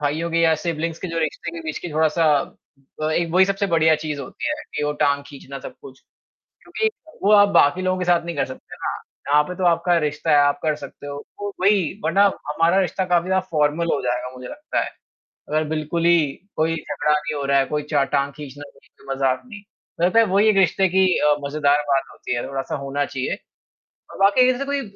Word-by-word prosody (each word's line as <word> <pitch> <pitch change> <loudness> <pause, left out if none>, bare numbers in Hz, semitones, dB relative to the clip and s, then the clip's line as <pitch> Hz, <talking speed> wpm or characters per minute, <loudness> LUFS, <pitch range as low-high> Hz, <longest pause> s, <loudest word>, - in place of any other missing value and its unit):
भाइयों 155 +3 -1
के 165 - +1
या 165 -1 +4
सिब्लिंग्स 165 0 -2
के 185 - -5
जो 165 0 -3
रिश्ते 165 +1 -3
के 165 - -6
बीच 155 -1 -4
की 175 - -7
थोड़ा-सा 160 +1 +2 0.8
अ, 155 - 0
एक 170 +1 0
वही 185 +2 +6
सबसे 195 +1 -1
बढ़िया 160 -3 +4
चीज़ 150 -2 -3
होती 130 - -5
है 305 - 0 0.2
कि - - -1
वो 150 - 0
टाँग 140 0 +1
खींचना 140 -1 -9
सब - - -9
कुछ। 130 -1 -13 0.6
क्योंकि 440 0 -1 0.3
वो 200 - +4
आप 205 -1 +7
बाकी 160 -1 +4
लोगों 185 0 0
के 180 - -2
साथ 175 -1 +2
नहीं 170 -2 -4
कर - - 0
सकते 130 - -11
हो - - -18
ना - - -1 0.4
यहाँ 150 0 +5
पे 180 +4 -7
तो 185 - -4
आपका 175 0 +3
रिश्ता 150 -1 -1
है 150 - +6
आप 145 0 +3
कर 155 -1 +1
सकते 145 -1 -10
हो 145 0 -6 0.2
वो 205 - -2
वही 195 -4 +3
वरना 200 - +3 0.2
हमारा 165 +5 +2
रिश्ता 185 +1 -1
काफ़ी 175 -1 +1
ज़्यादा 190 0 +1
फ़ॉर्मल 155 +2 +1
हो - - -1
जाएगा 125 0 -2
मुझे 125 0 -9
लगता 300 +1 -4
है, - - -6 0.6
अगर 155 +1 +1
बिल्कुल 160 +2 -2
ही 170 0 +6 0.4
कोई 160 +1 +1
झगड़ा 155 -1 -2
नहीं 150 +1 -1
हो 145 - -3
रहा 140 0 +3
है, 135 - +2
कोई 150 +2 -2
च 145 -2 +4
टाँग 140 0 +1
खींचना 145 -1 -9
वो - - -22
ही - - -24
तो 135 - -9
मज़ाक 135 -1 0
में 230 -5 -10
मुझे 200 -4 -6
लगता 225 +6 +5
वही 205 +2 +4
एक 210 - +3
रिश्ते 190 0 +3
की 190 +1 +3
अ, 150 0 +4
मज़ेदार 145 0 +2
बात 135 -1 +2
होती - - -4
है 120 - -3
थोड़ा-सा 135 -1 -4
होना 140 0 -2
चाहिए। 130 -2 -3 0.7
और - - -11
वाक़ई 205 +6 +5
ऐसे 255 +2 -3
कोई 280 0 -1
160 Hz, 230 wpm, -22 LUFS, 145-185 Hz, 0.8 s, आप